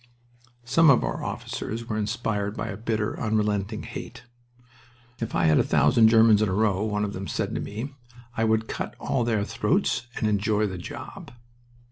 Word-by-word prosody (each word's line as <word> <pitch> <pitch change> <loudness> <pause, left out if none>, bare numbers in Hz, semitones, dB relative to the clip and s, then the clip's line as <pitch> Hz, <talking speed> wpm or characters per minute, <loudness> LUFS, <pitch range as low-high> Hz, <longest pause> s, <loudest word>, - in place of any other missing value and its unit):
Some 165 +6 +5
of 135 - +5
our - - -3
officers 115 +1 -5
were 110 - -3
inspired 105 -1 -2
by 115 - -3
a 105 - -4
bitter, 110 0 -2
unrelenting 105 -1 -1
hate. 120 0 -8 1.0
"If 115 - -4
I - - +2
had 80 -1 +5
a - - +4
thousand 115 -2 +4
Germans 110 -1 +6
in 110 - +2
a - - -1
row," 105 -1 +1
one 105 -1 -1
of 100 - -5
them 95 0 -5
said - - -2
to - - -2
me, 115 +7 -5 0.4
"I 115 - 0
would 110 0 +1
cut - - -5
all 130 -3 0
their 110 -3 +1
throats, 120 - 0
and 110 - 0
enjoy 105 +1 +1
the 95 -3 -4
job." 90 - -8
110 Hz, 180 wpm, -25 LUFS, 105-115 Hz, 1.0 s, Germans